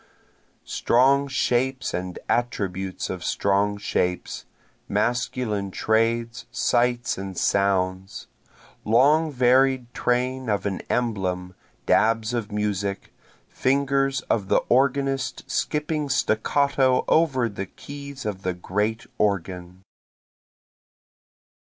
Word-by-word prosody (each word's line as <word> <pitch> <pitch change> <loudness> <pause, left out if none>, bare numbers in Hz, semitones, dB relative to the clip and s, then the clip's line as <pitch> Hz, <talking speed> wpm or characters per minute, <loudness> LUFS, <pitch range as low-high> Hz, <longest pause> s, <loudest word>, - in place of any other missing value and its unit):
Strong 135 +3 +3
shapes 130 -1 0
and 90 0 -4
attributes 95 -6 -2
of 90 -2 -5
strong 100 +1 +1
shapes, 90 -3 -2 0.4
masculine 120 -4 -1
trades, 115 +4 0
sights 120 -2 +1
and 95 -2 -6
sounds. 95 -1 0 0.6
Long 150 +8 +4
varied 130 -1 +3
train 125 0 -1
of 105 -1 0
an 100 -2 -2
emblem, 95 -6 -1 0.3
dabs 115 +1 +2
of 115 -3 -3
music, 100 -1 -2 0.3
Fingers 135 0 +1
of 100 -4 -1
the - - +2
organist 135 0 +1
skipping 150 -1 -1
staccato 130 +3 +2
over 135 -7 +3
the 100 -3 -5
keys 140 +3 -9
of 100 -3 -3
the 90 -2 -2
great 105 +5 -2
organ. 90 -2 -2
115 Hz, 95 wpm, -24 LUFS, 100-130 Hz, 0.6 s, Long